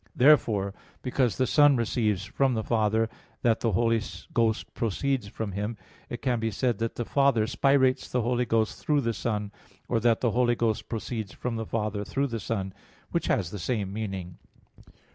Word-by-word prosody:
Therefore, 115 Hz, -9 st, +4 dB, 0.3 s
because 125 Hz, -2 st, +1 dB
the 130 Hz, -, +2 dB
Son 145 Hz, +1 st, +5 dB
receives 110 Hz, -5 st, 0 dB
from 135 Hz, +2 st, +1 dB
the 110 Hz, -, -1 dB
Father 110 Hz, 0 st, +2 dB, 0.4 s
that 115 Hz, -2 st, +3 dB
the 115 Hz, -3 st, 0 dB
Holy 115 Hz, +2 st, +2 dB, 0.3 s
Ghost 115 Hz, -1 st, +1 dB
proceeds 120 Hz, +2 st, -1 dB
from 105 Hz, 0 st, -4 dB
Him, 105 Hz, +4 st, -3 dB, 0.3 s
it 120 Hz, -, -6 dB
can 125 Hz, -3 st, +1 dB
be 115 Hz, 0 st, 0 dB
said 120 Hz, +3 st, 0 dB
that 115 Hz, 0 st, -2 dB
the 120 Hz, -, -3 dB
Father 135 Hz, -5 st, +3 dB
spirates 130 Hz, +2 st, +2 dB
the 125 Hz, -2 st, 0 dB
Holy 125 Hz, +1 st, +1 dB
Ghost 110 Hz, -1 st, 0 dB
through 150 Hz, -2 st, +2 dB
the 115 Hz, -2 st, -1 dB
Son, 105 Hz, -1 st, -2 dB, 0.4 s
or 115 Hz, -, +1 dB
that 115 Hz, 0 st, +2 dB
the 120 Hz, -, +2 dB
Holy 120 Hz, +1 st, +2 dB
Ghost 110 Hz, -2 st, -1 dB
proceeds 110 Hz, -1 st, -4 dB
from 120 Hz, -2 st, -4 dB
the 110 Hz, -1 st, -4 dB
Father 105 Hz, -2 st, -2 dB
through 135 Hz, +6 st, -1 dB
the 115 Hz, -4 st, -3 dB
Son, 95 Hz, -2 st, -3 dB, 0.4 s
which -, -, -1 dB
has 90 Hz, -3 st, 0 dB
the 105 Hz, -, -6 dB
same 100 Hz, -1 st, -2 dB
meaning. 95 Hz, -5 st, -5 dB
115 Hz, 180 wpm, -27 LUFS, 105-125 Hz, 0.4 s, Son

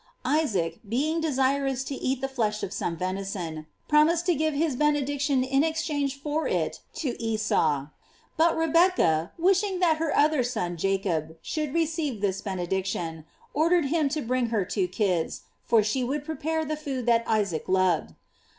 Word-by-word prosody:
Isaac 195 Hz, -, 0 dB
baing 290 Hz, +10 st, 0 dB
desirous 270 Hz, -2 st, +1 dB
to 280 Hz, -, -5 dB
eat 260 Hz, -1 st, -2 dB
the 270 Hz, -, 0 dB
flesh 220 Hz, -5 st, -1 dB
of 190 Hz, -, -3 dB
some 170 Hz, -1 st, -2 dB
venison, 185 Hz, -4 st, -4 dB, 0.2 s
promised 320 Hz, +3 st, +4 dB
to 355 Hz, -, +3 dB
give 310 Hz, 0 st, 0 dB
his 300 Hz, -2 st, +1 dB
benediction 285 Hz, -1 st, +1 dB
in 270 Hz, +2 st, +2 dB
ex 320 Hz, 0 st, 0 dB
change 285 Hz, -4 st, -2 dB
for 300 Hz, +2 st, -1 dB
it -, -, -1 dB, 0.2 s
to 295 Hz, -, -2 dB
Esau; 180 Hz, -11 st, +1 dB, 0.5 s
but 330 Hz, +1 st, +3 dB
Rebecca 325 Hz, -, +3 dB
wishing 380 Hz, +2 st, +2 dB
that 335 Hz, -4 st, +3 dB
her 320 Hz, -1 st, -1 dB
other 300 Hz, -1 st, +4 dB
son 180 Hz, -8 st, -2 dB
Jacob 170 Hz, -3 st, -1 dB
should 305 Hz, -3 st, -2 dB
receive 320 Hz, -7 st, 0 dB
this 195 Hz, -1 st, -1 dB
ben 195 Hz, -2 st, -4 dB
ediction, 175 Hz, -3 st, -3 dB, 0.3 s
ordered 335 Hz, +2 st, +3 dB
him 310 Hz, -4 st, +2 dB
to 305 Hz, 0 st, -2 dB
bring 250 Hz, +1 st, 0 dB
her 220 Hz, -5 st, 0 dB
two 190 Hz, -1 st, -1 dB
kids, 180 Hz, -3 st, -1 dB, 0.2 s
for 225 Hz, -2 st, +4 dB
she 235 Hz, +5 st, 0 dB
would 280 Hz, +4 st, -2 dB
prepare 320 Hz, 0 st, -2 dB
the 310 Hz, +1 st, -2 dB
food 275 Hz, -5 st, -4 dB
that 235 Hz, -1 st, +3 dB
Isaac 200 Hz, -7 st, 0 dB
loved. 185 Hz, -3 st, +2 dB
265 Hz, 165 wpm, -26 LUFS, 195-310 Hz, 0.5 s, promised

